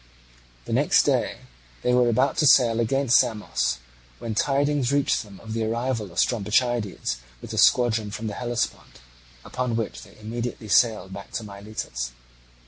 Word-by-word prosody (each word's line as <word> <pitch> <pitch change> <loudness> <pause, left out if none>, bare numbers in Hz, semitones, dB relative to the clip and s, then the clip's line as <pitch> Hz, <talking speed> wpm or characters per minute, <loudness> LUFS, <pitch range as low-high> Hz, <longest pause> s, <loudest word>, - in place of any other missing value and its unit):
The - - -4
next - - +4
day - - 0 0.4
they 125 - +2
were 125 -1 +4
about 125 +4 +2
to 150 - +4
sail 120 -4 +5
against 125 +1 +3
Samos, 110 - 0 0.4
when 115 -1 -5
tidings 140 +1 +1
reached 140 -1 +2
them 100 -4 -13
of 110 -1 -7
the 115 0 -1
arrival 115 -2 -2
of - - -14
Strombichides 115 - 0 0.2
with - - -9
the - - -1
squadron 115 -4 +4
from 105 +2 -6
the 105 - -3
Hellespont, 120 - -3 0.5
upon 125 -2 -2
which 105 - -3
they - - -16
immediately 115 0 -5
sailed 105 -4 +3
back 100 0 -9
to 115 - -3
Miletus. 100 - -6
115 Hz, 155 wpm, -24 LUFS, 105-125 Hz, 0.5 s, sail